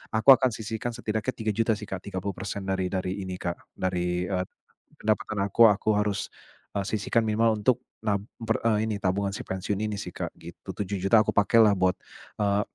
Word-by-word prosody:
Aku 110 +5 +3
akan 130 -1 +2
sisihkan 110 +2 -4
setidaknya 110 +4 -2
3.000.000 110 0 0
sih, 105 0 -8
Kak. 95 -1 -5
30% 100 0 -4
dari 95 -1 0
dari 95 +1 -2
ini 95 -1 -4
Kak, 85 0 -5
dari 90 -1 -1
eee 95 -1 -1 0.5
pendapatan 110 0 0
aku 110 - 0
aku 105 - -3
harus, 105 -1 -1 0.5
e 100 - +1
sisihkan 110 +2 +1
minimal 110 0 +2
untuk 125 +4 +2 0.2
nab 100 -2 +1 0.2
per 115 -1 +1
e 110 -1 +2
ini, 105 - -1
tabungan 100 +1 0
si 125 - -5
pensiun 95 +2 -2
ini 105 -1 -2
sih, - - -6
Kak. - - -3
Gitu. - - -12
7.000.000 100 +2 +1
aku - - 0
pakailah 105 0 +5
buat, 90 0 +2 0.5
eee, 100 0 +2
100 Hz, 180 wpm, -27 LUFS, 95-110 Hz, 0.5 s, pakailah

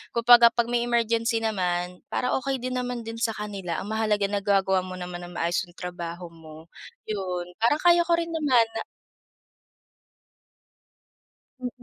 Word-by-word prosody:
Kumbaga 235 0 +8
'pag 235 0 0
may 240 0 +1
emergency 230 -1 +1
naman, 180 -4 -1
para 250 - -1
okey 265 -2 -3
din 255 0 -2
naman 245 -1 -4
din 225 0 -7
sa 225 -1 0
kanila. 200 -5 -5
Ang 210 - -7
mahalaga 215 -2 +1
nagagawa 195 -2 +2
mo 185 0 -6
naman 180 -1 -6
ng 175 - -12
maayos 170 +1 0
yung 175 - -20
trabaho 175 -1 -6
mo, 160 0 -14 0.4
yun. 180 -4 -3
Parang 235 +7 +2
kaya 345 -1 +5
ko 340 - +2
rin 335 0 0
naman 285 -8 +3
na - - -3 2.8
Mm. 250 - -2
220 Hz, 150 wpm, -25 LUFS, 180-240 Hz, 2.8 s, Kumbaga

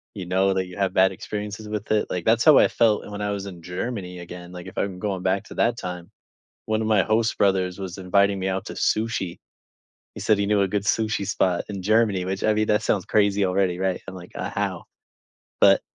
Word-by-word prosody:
you 95 -3 -5
know 95 +2 +2
that 95 - 0
you 90 +1 -11
had 95 -2 0
bad 95 0 +5
experiences 105 +1 -6
with 105 0 -4
it, 105 -1 +2
like, 90 -2 -3
that's 115 +1 +4
how 155 -3 +8
I - - +6
felt 110 -3 +2
when 105 0 -5
I 105 - -1
was 100 -1 -4
in 90 -4 -9
Germany 90 +1 -5
again, 90 0 -9
like, 90 -1 -9
if 95 - -11
I'm 95 -2 -2
going 95 -1 -3
back 95 +1 +1
to - - -10
that 120 0 +1
time, 90 -3 -6 0.6
one 110 0 0
of 110 - -1
my 110 -3 +4
host 110 +1 +1
brothers 95 -2 +1
was 95 -1 -6
inviting 100 +1 +2
me 95 - -2
out 95 0 -2
to - - -6
sushi. 110 -5 -1 0.8
He - - -8
said 105 -2 +3
he 100 - +1
knew 105 -1 +3
a 100 - +1
good 100 +1 -1
sushi 110 -2 0
spot 95 -3 +1
in 100 -2 -5
Germany, 105 -2 +2
which 95 +1 -3
I 110 - +3
mean, 110 0 +1
that 105 0 +2
sounds 100 -4 0
crazy 100 -1 +2
already, 90 -1 +1
right? 95 -1 -1
I'm 95 - -6
like, 90 -1 -11
"Uh, - - -4
how?" - - -3 0.8
But - - +6
100 Hz, 235 wpm, -24 LUFS, 90-105 Hz, 0.8 s, how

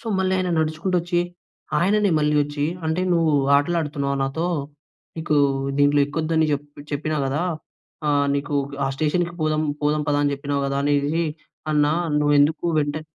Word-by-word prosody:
So, - - -14
మళ్ళీ 190 0 +1
ఆయన 185 -1 -1
నడుచుకుంటూ 160 +4 0
వచ్చి, 175 0 0 0.6
ఆయననే 205 +2 +2
మళ్ళి 150 0 +1
వచ్చి, 145 0 -3 0.2
అంటే 160 +3 0
నువ్వు 165 -2 +2 0.2
ఆటలు 155 +4 +1
ఆడుతున్నావా 140 -2 -2
నాతో? 160 +6 -2 0.7
నీకు 155 -1 -1 0.4
దీంట్లో 145 0 +4
ఎక్కోదు 160 +2 -3
అని 160 -1 +4
చెపి 145 0 -5
చెప్పినా 155 +2 -1
కదా! 145 +5 -1 0.7
ఆహ్, 145 -1 +2
నీకు 145 +1 -2 0.3
ఆ - - +1
స్టేషన్‌కి 170 +3 0
పోదాం 155 0 +1 0.2
పోదాం 150 +1 +1
పద 145 - +2
అని 145 - +1
చెప్పినావు 140 0 -2
కదా! 140 0 -2
అనేసిసి. 145 +3 +1 0.5
అన్నా 150 0 +3 0.3
నువ్వు 145 0 +3
ఎందుకు 155 +4 +2
వెంటనే 145 +1 -1
150 Hz, 160 wpm, -22 LUFS, 145-165 Hz, 0.7 s, దీంట్లో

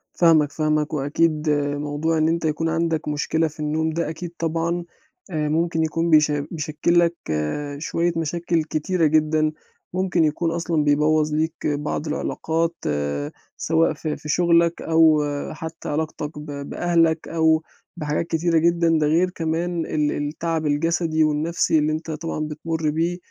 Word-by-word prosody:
فاهمك، 155 -4 +4
فاهمك، 155 0 0
وأكيد 150 +2 +1 0.3
موضوع 150 +2 -1
إن 155 0 +3
أنت 165 0 0
يكون 160 +1 0
عندك 165 0 -1
مشكلة 160 +2 0
في 155 0 -12
النوم 155 +1 0
ده 165 0 -2
أكيد 165 +2 -6
طبعًا 165 +1 -1 0.5
آآ، 150 -2 -1
ممكن 165 +1 +1
يكون 165 +2 0
بيش 155 -1 +5
بيشكّل 155 +3 0
لك 170 0 +2 0.6
شوية 165 +3 0
مشاكل 165 +1 0
كتيرة 160 +3 0
جدًا، 155 0 +2 0.4
ممكن 185 -2 +1
يكون 160 +2 0
أصلًا 165 -2 0
بيبوّظ 150 +1 +2
ليك 155 +1 0
بعض 150 +1 -2
العلاقات، 165 +2 -1 0.8
سواء 165 +1 +2
في 155 -2 -4
في 150 - -9
شُغلك 170 0 +3
أو 160 -2 +4 0.3
حتى 160 +1 -7
علاقتك 150 0 -3
ب 150 - -8 0.2
بأهلك 165 -2 +1
أو 160 -1 +2 0.3
بحاجات 150 +2 -2
كتيرة 165 0 +1
جدًا، 170 0 +3
ده 150 - +2
غير 170 +4 +3
كمان 170 0 -2
ال 150 -1 0
التعب 160 +2 -2
الجسدي 160 +2 +1
والنَفْسي 155 +2 +1
اللي 150 +1 +1
أنت 160 +1 -4
طبعًا 155 +1 -4
بتمرّ 155 +1 -2
بيه 165 +3 0
160 Hz, 145 wpm, -23 LUFS, 150-165 Hz, 0.8 s, بيش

